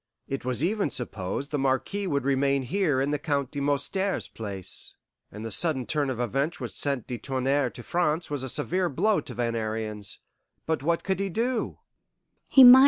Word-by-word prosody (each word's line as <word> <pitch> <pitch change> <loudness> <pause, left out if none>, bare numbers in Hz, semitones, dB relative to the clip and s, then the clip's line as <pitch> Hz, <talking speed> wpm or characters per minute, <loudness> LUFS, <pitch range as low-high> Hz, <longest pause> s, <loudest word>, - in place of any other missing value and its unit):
It 135 - -3
was 125 +3 -1
even 200 -1 +1
supposed 120 +2 -4
the 145 - 0
Marquis 135 +10 0
would 140 -6 0
remain 140 0 +2
here 155 -1 +1
in 140 +2 +1
the 150 - 0
Count 140 -2 -1
de 145 - -4
Moustier's 185 +8 0
place, 100 -4 -1 0.4
and 105 +2 -7
the 115 - -4
sudden 135 - +2
turn 145 0 0
of 125 -3 -3
events 135 +7 0
which - - -4
sent 140 -5 0
de 120 -2 -5
Tounnerre 135 0 +1
to 120 - -10
France 170 +1 +1
was 145 -2 -3
a 130 - -3
severe 180 +7 0
blow 210 +10 +2
to - - -9
Van 115 -1 0
Ariens. 110 -2 -3 0.5
But 160 -3 0
what 165 +3 +1
could 190 -1 0
he 195 0 0
do?" 230 +5 -1
140 Hz, 180 wpm, -27 LUFS, 125-165 Hz, 0.5 s, remain